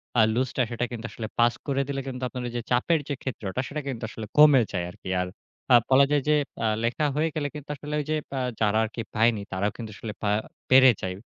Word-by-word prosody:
অ্যা 110 - +6
লুজটা 130 0 0
সেটা 120 +1 -1
কিন্তু 115 -1 -6
আসলে 110 -2 -5
পাস 120 0 +5
করে 140 0 +1
দিলে 135 -1 -2
কিন্তু, 130 -1 -5
আপনার 125 -1 -6
যে - - -2
চাপের 150 +6 +3
যে - - 0
ক্ষেত্রটা। 115 -4 -4
সেটা 150 +1 -4
কিন্তু 120 -3 -4
আসলে 110 -1 -7
কমে 150 -4 +8
যায় 90 -3 -2
আরকি। 95 - -10
আর 90 - -2 0.5
আ - - +10
বলা 135 +1 +6
যায় 145 -1 +3
যে, 150 - +5 0.2
অ্যা 115 - +1 0.2
লেখা 120 +6 0
হয়ে 160 +2 +1
গেলে 145 -2 -1
কিন্তু 150 0 -9
আসলে 150 +2 -7
ওই 145 - -3
যে - - +2 0.2
আ - - 0 0.2
যারা 105 0 +3
আরকি 110 +1 -4
পায়নি 110 -1 +3
তারাও 100 +2 0
কিন্তু 110 -2 -7
আসলে 105 -1 -6
পা 105 - 0 0.4
পেরে 130 -1 +8
যায়। 95 -1 -3
125 Hz, 230 wpm, -26 LUFS, 110-140 Hz, 0.5 s, আ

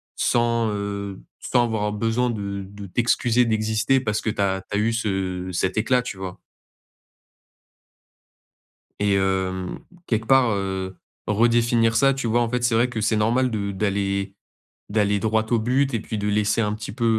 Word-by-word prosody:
sans, 115 -1 +1
heu, 100 -1 -4 0.2
sans 120 -2 +2
avoir 105 -2 -1
besoin 115 +3 0
de 100 -3 -4
de 100 0 -10
t'excuser 120 +3 +2
d'exister 110 +3 +1
parce 105 -4 -1
que - - -1
tu 105 - -2
as 95 -1 0
tu 100 - 0
as - - +1
eu 115 +1 +1
ce 95 -4 -2
cet 95 +2 -1
éclat, 125 +3 +2
tu 115 -5 -6
vois? 95 -1 -6 2.6
Et 100 -1 +2
hem, 95 -1 -1 0.3
quelque 110 -1 0
part, 130 -1 +5
heu, 95 -2 -3 0.3
redéfinir 115 +1 +3
ça 135 +2 +4
tu 135 -2 -4
vois 115 +1 +2
en 115 - 0
fait 125 0 -1
c'est 120 -1 +2
vrai 120 +2 +3
que 115 -3 -3
c'est 110 0 +1
normal 120 +4 +2
de 100 -2 -2
d'aller 100 -1 -1 0.6
d'aller 105 -1 +1
droit 110 +1 +1
au 115 - +3
but 130 +4 +1
et 115 - +1
puis 110 - -5
de 105 0 -2
laisser 105 +2 +1
un 105 -1 0
petit 105 -2 -6
peu, 115 -1 -2
110 Hz, 175 wpm, -23 LUFS, 100-115 Hz, 2.6 s, part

